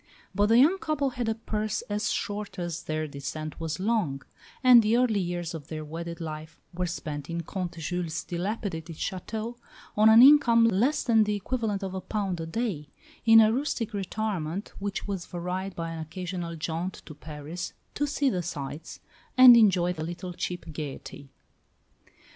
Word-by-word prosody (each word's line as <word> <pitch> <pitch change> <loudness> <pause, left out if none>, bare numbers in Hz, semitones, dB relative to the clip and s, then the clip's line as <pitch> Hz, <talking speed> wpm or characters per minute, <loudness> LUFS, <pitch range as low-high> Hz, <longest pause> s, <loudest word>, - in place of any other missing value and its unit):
But 205 +2 +3
the 225 +2 +5
young 320 +10 +5
couple 290 -5 -1
had 245 -2 -2
a 220 - 0
purse 215 -1 -3
as 210 +1 -2
short 205 0 -3
as 175 -2 -3
their 155 0 -2
descent 140 +2 -6
was 165 +1 -3
long; 185 - 0 0.4
and 250 -2 +9
the 220 +2 +2
early 240 -5 +2
years 175 -2 -3
of 155 -3 -8
their 155 -1 -6
wedded 170 +2 -6
life 155 -1 -7
were 180 +1 -2
spent 150 -4 -5
in 170 0 -2
Comte 175 0 -5
Jules' 170 0 -3
dilapidated 175 -3 -4
château, 220 +8 -4 0.4
on 215 +1 +6
an 225 +2 +9
income 255 -5 +7
less 230 +7 +2
than 225 -3 +4
the 210 0 0
equivalent 205 -1 -2
of 190 -1 -4
a 190 - -4
pound 195 -5 -2
a 160 - -5
day 170 -6 -3 0.4
in 225 0 +9
a 220 0 +5
rustic 240 -4 -2
retirement 200 -3 -3
which 200 0 -4
was 195 -4 -4
varied 180 +2 -4
by 165 -1 -4
an 165 - -6
occasional 170 +1 -5
jaunt 165 +3 -4
to 155 - -9
Paris 150 +3 -7 0.2
to 290 - -1
"see 280 -2 +1
the 180 - -1
sights," 155 -1 -6 0.4
and 255 -1 +11
enjoy 190 -6 +4
a 155 - -6
little 175 +2 -6
cheap 175 +1 -4
gaiety. 140 -2 -7
185 Hz, 170 wpm, -27 LUFS, 165-220 Hz, 0.4 s, and